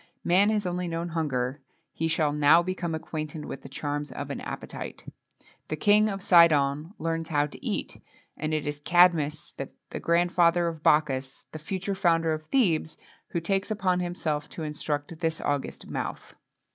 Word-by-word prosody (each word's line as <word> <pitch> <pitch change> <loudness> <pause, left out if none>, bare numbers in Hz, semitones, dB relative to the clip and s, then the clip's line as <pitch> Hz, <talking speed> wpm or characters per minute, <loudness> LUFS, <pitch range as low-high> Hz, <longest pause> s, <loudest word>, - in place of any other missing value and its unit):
Man 190 +4 +4
has 210 -2 0
only 180 0 -2
known 170 +1 -3
hunger; 145 -4 -2 0.3
he 165 - -1
shall 160 -2 +1
now 150 +3 +5
become 175 -2 -2
acquainted 155 -1 -5
with - - -7
the 135 - -11
charms 145 +2 -3
of 145 0 -5
an - - -5
appetite. - - -7 0.6
The - - -2
King 210 +6 +4
of 195 -2 -5
Sidon 160 -1 +4
learns 165 0 -2
how 145 -2 +2
to 150 - -11
eat, - - -3 0.3
and 155 +1 -3
it 155 -1 -1
is 145 0 -3
Cadmus, 170 -1 +3
the 135 - -8
grandfather 175 0 +3
of 165 -2 -4
Bacchus, 135 -4 +1
the 155 - -7
future 190 +5 -3
founder 165 -4 +2
of 155 - -3
Thebes, 170 - +1 0.3
who 170 - -2
takes 195 +5 -1
upon 185 -4 +1
himself 160 -4 -2
to 165 - -6
instruct 150 +1 -3
this 160 -2 -1
august 145 -1 -2
mouth. - - -5
160 Hz, 165 wpm, -27 LUFS, 150-175 Hz, 0.6 s, now